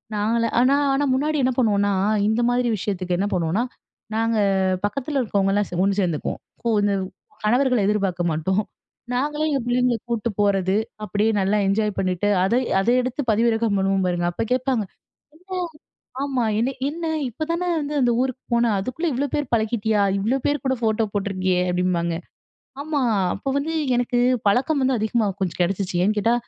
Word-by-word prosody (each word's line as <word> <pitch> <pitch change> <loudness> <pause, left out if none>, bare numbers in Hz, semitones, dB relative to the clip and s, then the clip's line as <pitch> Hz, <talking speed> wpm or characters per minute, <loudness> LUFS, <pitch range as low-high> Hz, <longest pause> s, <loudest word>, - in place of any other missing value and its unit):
நாங்களா 225 +2 +1
ஆனா 255 +3 +4 0.2
ஆனா 280 +2 +1
முன்னாடி 300 +4 0
என்ன 255 - +3
பண்ணுவோனா, 205 -4 +2 0.4
இந்த 220 +2 +1
மாதிரி 245 0 +1
விஷயத்துக்கு 185 -2 -2
என்ன 200 +3 0
பண்ணுவோனா, 180 +5 0 0.5
நாங்க 225 0 +1 0.5
பக்கத்துல 275 +6 -2
இருக்கறவங்கலா 200 -3 +1
சே 175 - -5
ஒண்ணு 200 +1 +1
சேர்ந்துப்போ. 170 -5 -1 0.3
கு 235 - 0
இந்த 205 0 +2 0.5
கணவர்கள 250 +3 +3
எதிர்பாக்க 195 -4 0
மாட்டோ. 160 +4 -1 0.6
நாங்களே 295 +4 -1
எங்க 280 - +1
பிள்ளைங்கள 245 0 +2
கூட்டு 235 -1 -1
போறது. 195 -2 +2 0.3
அப்படியே 210 +2 +1
நல்லா 195 +2 +2
என்ஜாய் 210 +1 0
பண்ணிட்டு 185 +2 0
அத 190 - +1 0.3
அதை 235 +5 +2
எடுத்து 255 +3 -3
பதிவிறக்கம் 225 -1 +2
பண்ணுவோ 195 0 +1
பாருங்க! 175 -1 0
அப்போ 175 - -2
கேப்பாங்க. 255 -4 0 0.5
"என்ன? 365 +2 -5 0.6
ஆமா, 265 -3 0 0.2
என்ன 240 +4 +1 0.2
என்ன? 330 +3 -5 0.2
இப்பதானே 335 +8 -3
வந்து 295 0 -4
அந்த 245 -1 +3
ஊருக்கு 260 0 -2
போன, 235 0 +3
அதுக்குள்ள 255 - -3
இவ்ளோ 270 +4 0
பேர் 290 - -2
பழகிட்டியா? 220 -1 +1 0.2
இவ்ளோ 225 +7 +1
பேர் 290 -2 0
கூட 265 0 +2
ஃபோட்டோ 220 -1 +1
போட்ருக்கியே" 185 -2 0
அப்படிபாங்க. 175 -2 0 0.7
ஆமா, 295 0 -1 0.3
அப்போ 240 - -5
வந்து 305 +3 -2 0.2
எனக்கு, 245 0 0 0.3
பழக்கம் 270 +7 +2
வந்து 260 -1 +2
அதிகமா 220 +1 +1
கொஞ்ச 185 -4 0
கிடச்சிச்சு. 185 +1 -1
ஏன் 210 +2 +2
கேட்டா, 230 +3 +2
225 Hz, 155 wpm, -23 LUFS, 195-255 Hz, 0.7 s, ஆனா